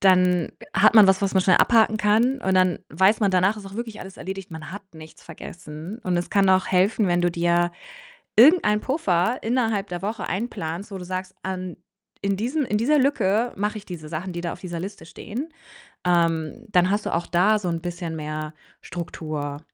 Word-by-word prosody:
dann, 180 -2 +4
äh, - - -12
hat 205 +4 +5
man 215 -3 +9
was, 190 +1 +3
was 195 0 0
man 190 - +4
schnell 185 - +4
abhaken 220 -2 +4
kann 220 +6 +2
und 190 -7 0
dann 185 -2 +3
weiß 190 +8 +3
man 200 - +3
danach, 190 +3 +2
es 205 - -10
ist 195 - -9
auch 200 - -10
wirklich 225 -2 -6
alles 190 0 -10
erledigt, 190 +1 -7
man 160 +1 -8
hat 205 - -7
nichts 155 0 -13
vergessen 165 +3 -9
und 180 -5 0
es 175 - -3
kann 200 -1 +3
auch 185 0 +4
helfen, 195 +3 +2
wenn 175 0 +2
du 175 - +2
dir 175 0 +1 0.7
irgendeinen 235 -5 +6
Puffer 225 - 0
innerhalb 225 -4 0
der 175 -1 -5
Woche 215 +3 -3
einplanst, 190 -3 -4
wo 195 - -6
du 180 - -8
sagst: 185 +1 -5
„An 185 -2 -4 0.5
in 200 -1 0
diesem 255 +9 -1
in 210 -4 -1
dieser 290 +7 +3
Lücke 240 -4 +1
mache 210 +2 -2
ich 205 - -12
diese 165 -4 -8
Sachen, 170 +4 -5
die 175 - -5
da 170 -1 -3
auf - - -10
dieser 175 -2 -5
Liste 190 -3 -8
stehen.“ 255 - -7 0.6
Ähm, 165 -2 0
dann 180 -1 +3
hast 205 +1 -1
du - - -2
auch 170 - -1
da 185 +6 +3
so 185 -4 -3
'n 165 -1 -2
bisschen 175 -2 -5
mehr 155 0 -5 0.3
Struktur. 155 -4 -5
190 Hz, 210 wpm, -23 LUFS, 175-210 Hz, 0.7 s, man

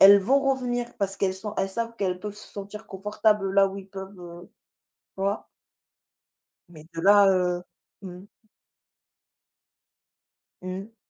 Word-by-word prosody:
elles 200 +1 +10
vont 270 +8 +3
revenir. 250 -3 -1
Parce 195 -1 -1
qu'elles 190 -1 +1
sont 210 +2 -6
elles 195 - +1
savent 230 +2 -3
qu'elles 185 -2 -1
peuvent 210 0 -5
se 210 - -12
sentir 205 +2 -8
confortables 205 0 +1
là 195 0 +6
où 195 +1 -7
ils 195 0 -11
peuvent, 190 0 -9
heu, 175 0 -11 0.7
vois? 195 +2 -1 1.2
Mais, 155 -3 -13
de 165 - -4
là, 200 +2 +7
heu, 180 -2 +2 0.4
mmh. 185 0 -9 2.4
Mmh. 195 +5 -6
195 Hz, 135 wpm, -26 LUFS, 190-210 Hz, 2.4 s, elles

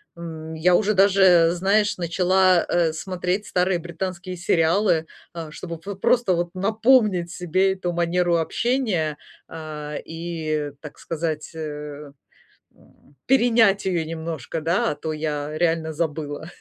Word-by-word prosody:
М, 160 -2 -8
я 175 +3 +3
уже 215 +3 +2
даже, 190 -3 +5
знаешь, 205 +3 +1
начала, 185 +1 +3
э, 170 -2 +1
смотреть 185 +4 -3
старые 180 -1 +1
британские 180 +2 -5
сериалы, 165 0 +2 0.3
э, 165 -2 -7
чтобы 170 +1 -7
п 200 +5 -7
просто 200 +1 +2
вот 175 0 -1
напомнить 210 -3 +2
себе 185 +2 +1
эту 180 -2 -3
манеру 175 0 +1
общения, 180 - 0 0.3
а, 150 -2 -7
и, 160 -3 -4
так 150 - -10
сказать, 160 -2 -4
э, 150 -2 -7 0.6
м 140 - -25
перенять 230 -6 +4
её 175 -4 0
немножко, 160 -2 -5
да, 180 +9 +1
а - - -4
то 160 - -4
я 150 -1 -3
реально 165 -2 0
забыла. 155 0 -4
170 Hz, 130 wpm, -23 LUFS, 160-190 Hz, 0.6 s, даже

